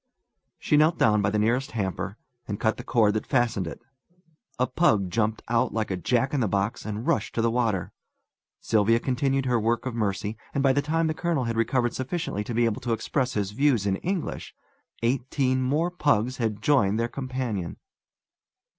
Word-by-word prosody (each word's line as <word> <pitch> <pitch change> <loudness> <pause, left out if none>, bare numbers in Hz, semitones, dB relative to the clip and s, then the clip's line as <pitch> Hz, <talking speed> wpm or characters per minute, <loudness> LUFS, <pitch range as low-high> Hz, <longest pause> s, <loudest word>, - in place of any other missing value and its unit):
She 150 - +2
knelt 155 +3 +4
down 105 -2 +3
by 100 - +2
the 105 - 0
nearest 120 +6 +1
hamper, 95 -1 -3 0.3
and 105 -1 -4
cut 110 - +1
the - - -7
cord 110 -4 +3
that 110 - -3
fastened 120 -8 +1
it. - - -7 0.8
A 125 - +2
pug 110 - +2
jumped 110 +2 0
out 120 +1 +1
like 110 -3 -1
a - - 0
jack 125 - 0
in 145 - +1
the 115 - +1
box, 100 +3 -1
and 110 +2 -4
rushed 110 - 0
to 115 - +1
the 115 - +2
water. 115 -7 0 0.7
Sylvia 115 +1 +3
continued 135 +1 0
her 125 -2 +2
work 115 +2 0
of 130 - -3
mercy, 105 -1 -2 0.2
and 140 - +1
by 135 -1 +4
the 145 - +2
time 165 +3 0
the 155 - 0
colonel 165 -4 -1
had 115 -1 -2
recovered 120 +1 +1
sufficiently 130 - -3
to 120 - -4
be 120 +1 +3
able 115 -2 -1
to 120 -2 -1
express 130 +3 -1
his 100 -2 -1
views 125 -3 +2
in 95 -1 +1
English, 180 - -4 0.5
eighteen 130 +1 +1
more 150 +7 +1
pugs 130 -7 +1
had 110 -3 -2
joined 110 -8 +3
their 115 - +1
companion. 125 -8 -4
115 Hz, 190 wpm, -26 LUFS, 105-130 Hz, 0.8 s, knelt